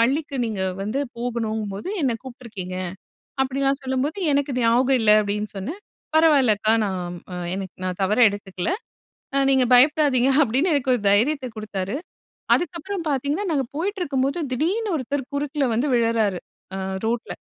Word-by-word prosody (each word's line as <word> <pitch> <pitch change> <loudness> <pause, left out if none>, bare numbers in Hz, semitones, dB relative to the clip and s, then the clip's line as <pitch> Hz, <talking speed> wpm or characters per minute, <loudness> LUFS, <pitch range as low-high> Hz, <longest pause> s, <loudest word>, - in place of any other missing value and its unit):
பள்ளிக்கு 275 +4 +1
நீங்க 205 -4 -2 0.2
வந்து 215 +7 -1 0.2
போகணுங்கும்போது 220 - -3
என்ன 250 -4 +1
கூப்பிட்டுருக்கீங்க" 235 -8 -7 0.7
அப்படிலாம் 275 +1 0
சொல்லும்போது, 265 +6 -1 0.2
"எனக்கு 280 0 +1
ஞாபகம் 250 +3 +3
இல்ல" 210 -1 +5
அப்படின்னு 210 +1 -2
சொன்னேன். 305 - -5 0.4
"பரவாயில்ல 285 -9 +5
அக்கா. 220 +1 +3
நான் 180 -2 -4 0.2
அ - - -4 0.2
எனக்கு 195 -2 -6
நான் 185 +1 -3
தவறா 210 +6 +4
எடுத்துக்கல. 190 - -4 0.7
அ 275 - +4
நீங்க 265 -2 +4
பயப்படாதீங்க", 275 -1 +4
அப்படின்னு 270 +9 +1
எனக்கு 260 -2 +2
ஒரு 235 - -4
தைரியத்த 255 +6 +2
குடுத்தாரு. 205 +2 -3 0.6
அதுக்கப்புறம் 350 +2 -3
பார்த்தீங்கன்னா, 285 +8 -1
நாங்க 275 -4 +1
போயிட்டுருக்கும்போது 325 -5 -1
திடீர்னு 370 - 0
ஒருத்தர் 270 -1 -3
குறுக்குல 285 0 -1
வந்து 245 +6 +1
விழறாரு. 225 -5 +2 0.4
அ - - -3 0.3
ரோட்ல. 235 +1 -2
255 Hz, 135 wpm, -23 LUFS, 215-285 Hz, 0.7 s, இல்ல